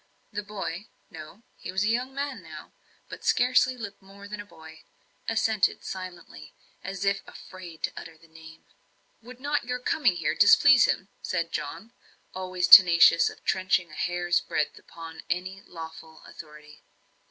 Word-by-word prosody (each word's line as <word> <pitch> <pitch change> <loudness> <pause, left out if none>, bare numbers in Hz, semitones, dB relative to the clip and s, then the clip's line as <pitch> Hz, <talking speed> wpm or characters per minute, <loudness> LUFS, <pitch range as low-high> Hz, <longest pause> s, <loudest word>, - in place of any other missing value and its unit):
The 210 - -3
boy 200 -2 -6 0.2
no, 160 +8 -12
he - - -7
was 190 +2 0
a - - 0
young 245 +4 -1
man 280 0 -5
now, - - -12 0.3
but - - -10
scarcely 255 +1 +2
looked 205 -4 -8
more 200 +1 -14
than 210 0 -7
a - - -13
boy 160 -3 -15 0.5
assented 220 -2 +1
silently, 180 - -9 0.3
as 195 +1 -5
if 195 0 +1
afraid 180 -4 -12
to - - -1
utter 165 -1 -10
the 165 - -21
name. 160 0 -15 0.6
"Would 245 +2 -13
not 290 -1 -2
your 250 +1 -3
coming 250 - +1
here 165 -3 -1
displease 260 +5 +6
him?" 195 - -2
said 170 -2 -3
John, 175 +11 -6 0.4
always 185 -1 -2
tenacious 170 -3 +8
of - - -14
trenching 185 -2 0
a - - -14
hair's 175 +1 0
breadth 150 - -3
upon 165 -1 -11
any 185 +2 -3
lawful 160 -1 -11
authority. 150 -1 -14
185 Hz, 155 wpm, -26 LUFS, 165-210 Hz, 0.6 s, tenacious